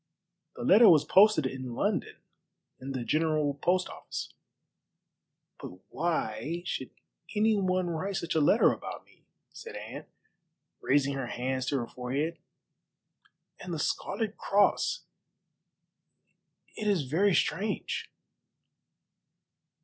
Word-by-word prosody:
"The - - -6
letter 215 +2 +7
was 155 -4 +5
posted 195 -2 +5
in 130 -2 -4
London - - -1 0.6
in 135 +1 -6
the 130 -2 -3
General 155 -1 +1
Post 180 +6 +1
Office." - - -7 1.3
"But 90 - -9
why 160 -1 -2
should - - -4 0.5
any 215 +1 +3
one 185 -2 +1
write 185 +4 -3
such 170 -2 -2
a 160 - +2
letter 145 - +5
about - - -7
me," - - -27 0.3
said - - -9
Anne, - - -8 0.7
raising 140 0 +2
her 135 -2 -3
hands 130 +2 -3
to 140 - +1
her 120 -2 -3
forehead, 140 +7 -3 1.2
"and 180 - -7
the 165 - -2
Scarlet 215 +7 -2
Cross? 200 0 +2 1.7
It 215 - -4
is 195 -7 +2
very 175 +8 +2
strange." 455 - -1
160 Hz, 115 wpm, -29 LUFS, 135-195 Hz, 1.7 s, letter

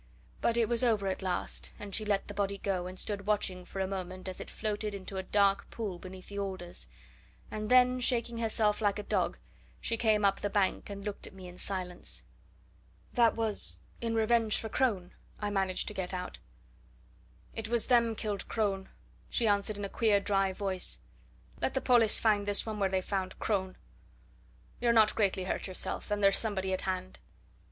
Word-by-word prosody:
But 235 - +2
it 230 -2 +3
was 235 +1 +2
over 220 -5 +3
at 190 0 -1
last, 185 -1 -2
and 205 -1 -8
she 215 - 0
let 205 -2 +1
the 205 - -6
body 200 0 -1
go, 185 -2 -1
and 185 0 -8
stood 205 -1 -3
watching 190 -4 0
for 195 - -7
a 190 - +1
moment 185 -1 -5
as 185 - -5
it - - -7
floated 210 -1 -3
into 195 0 -6
a - - 0
dark 200 +1 +2
pool 200 -6 -4
beneath 185 0 -10
the 200 0 -4
alders; 185 - -5 0.6
and 215 0 -3
then, 250 0 +6
shaking 235 -2 +2
herself 220 -2 +1
like 205 -1 +2
a 210 - -4
dog, 190 - 0 0.4
she 230 - -1
came 215 -3 +3
up 195 0 +3
the 205 - 0
bank 200 0 +1
and 200 0 -7
looked 205 -1 -4
at - - -12
me, 185 -1 -9
in 180 0 -11
silence. 180 - -4 0.9
"That 235 -2 +4
was 225 -2 0 0.2
in 230 -1 -1
revenge 225 -1 +3
for 220 - -4
Crone," 205 -7 0 0.3
I 205 -1 -2
managed 190 -2 +1
to - - -7
get 185 -2 -3
out. 180 0 -5 1.1
"It 225 -1 -4
was 235 -1 +2
them 235 -2 +4
killed 205 -2 -3
Crone," 195 -3 -1 0.4
she 235 - +1
answered 205 0 +1
in 205 - -3
a - - -2
queer 210 0 +3
dry 195 -1 +2
voice. 185 - 0 0.6
"Let - - 0
the - - +3
pollis 235 -4 +5
find 205 -2 +3
this 205 0 +2
one 215 -2 -4
where 195 -1 +2
they 190 0 +1
found 190 -2 -2
Crone! 190 -3 -1 1.0
You're 235 -1 +3
not 220 -2 +6
greatly 195 -3 +2
hurt 190 - -2
yourself 185 +3 -4
and 205 0 0
there's 195 0 +5
somebody 190 -4 -1
at 185 - -1
hand." 185 0 -3
200 Hz, 195 wpm, -31 LUFS, 190-220 Hz, 1.1 s, then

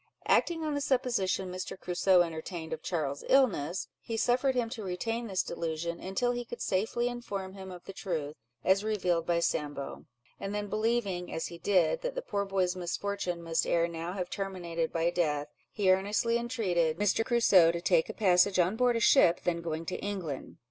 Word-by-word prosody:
Acting 330 -2 +2
on 305 -1 -1
the 285 - -1
supposition 235 -9 0
Mr. 185 +1 -5
Crusoe 180 0 +3
entertained 160 0 -5
of - - -5
Charles's 145 -5 -2
illness, 190 - +2
he 225 -1 -4
suffered 255 +3 +2
him 245 -2 +1
to 225 -3 -6
retain 225 +6 -3
this 190 -3 0
delusion, 170 +1 -3
until 195 +6 0
he 245 0 -3
could 240 0 -8
safely 220 +5 0
inform 200 -6 -5
him 190 -1 -9
of 180 -1 -10
the 195 - -9
truth, 160 -7 -3 0.3
as 190 +2 +3
revealed 180 -6 0
by 170 -1 +2
Sambo; 145 -4 -2 0.3
and 195 +1 -4
then 210 0 -2
believing, 215 -5 -1
as 160 - -3
he 170 - -10
did, 200 - +2
that - - -3
the - - -3
poor 200 -1 -2
boy's 190 -2 0
misfortunes 180 0 -3
must 165 -1 0
ere 170 0 +2
now 170 +1 -5
have 180 -2 -4
terminated 180 -4 -3
by 170 +1 +1
death, 150 -4 0 0.2
he 195 -3 +3
earnestly 205 +5 +1
entreated 200 -10 0
Mr. 205 +2 +2
Crusoe 210 -8 +5
to 170 - -3
take 170 -2 +2
a - - -4
passage 185 -1 +4
on 180 +3 +3
board 245 0 +3
a - - +1
ship 180 -8 +5
then 170 -1 0
going 165 -1 -4
to 180 - -3
England. 185 -9 -5
190 Hz, 190 wpm, -30 LUFS, 170-225 Hz, 0.3 s, Crusoe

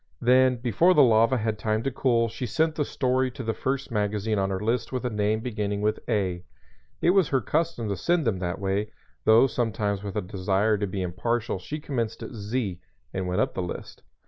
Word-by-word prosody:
Then 130 +1 +4
before 125 - +3
the 145 - +7
lava 115 +1 +4
had 110 -1 -2
time 110 0 0
to 135 - -1
cool 120 -2 +2
she 120 +3 -5
sent 160 +7 +1
the 150 - 0
story 130 -1 0
to 125 +1 -7
the 115 -1 -1
first 135 +2 -2
magazine 105 0 0
on 95 0 0
her 95 -1 -2
list 115 +3 -1
with 130 -1 -3
a 125 - -1
name 105 +1 0
beginning 105 -4 -2
with 105 +1 0
"A." 95 -5 0 0.6
It 175 - +5
was 190 -4 +4
her 135 - +2
custom 155 -4 -1
to 100 - -1
send 165 - +1
them 105 -5 0
that 90 0 -2
way, 100 +2 -1 0.3
though 110 +4 +7
sometimes 110 -5 -1
with 100 -2 -6
a 105 - 0
desire 95 +2 +1
to 100 - -1
be 95 0 -3
impartial 110 +4 -1
she 150 +12 -6
commenced 120 -7 -3
at - - -7
"Z" 105 -3 -3 0.3
and 95 -1 -2
went 90 +3 +1
up - - 0
the - - -2
list. 90 - -7
110 Hz, 215 wpm, -26 LUFS, 100-130 Hz, 0.6 s, the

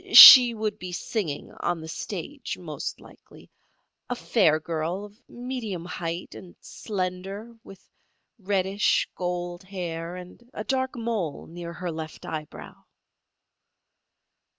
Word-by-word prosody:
She 245 -3 +12
would 215 -1 -3
be 180 0 -6
singing 175 -6 -3
on 175 -1 -1
the 160 - -8
stage, 160 - -5
most - - -6
likely. - - -17 0.6
A 245 - -1
fair 170 -10 +3
girl, 165 +4 -3
of 210 +4 -17
medium 240 -8 -5
height 170 -1 -5
and 175 - -12
slender, 195 +2 -5
with 195 - -14 0.5
reddish, 195 0 +1
gold 175 0 -4
hair 175 -3 -5
and 180 +5 -11
a 215 - -4
dark 260 +1 -1
mole 225 -10 -3
near 170 0 -8
her 175 0 -4
left 160 -1 -7
eyebrow." 155 -2 -8
185 Hz, 120 wpm, -26 LUFS, 170-215 Hz, 0.6 s, She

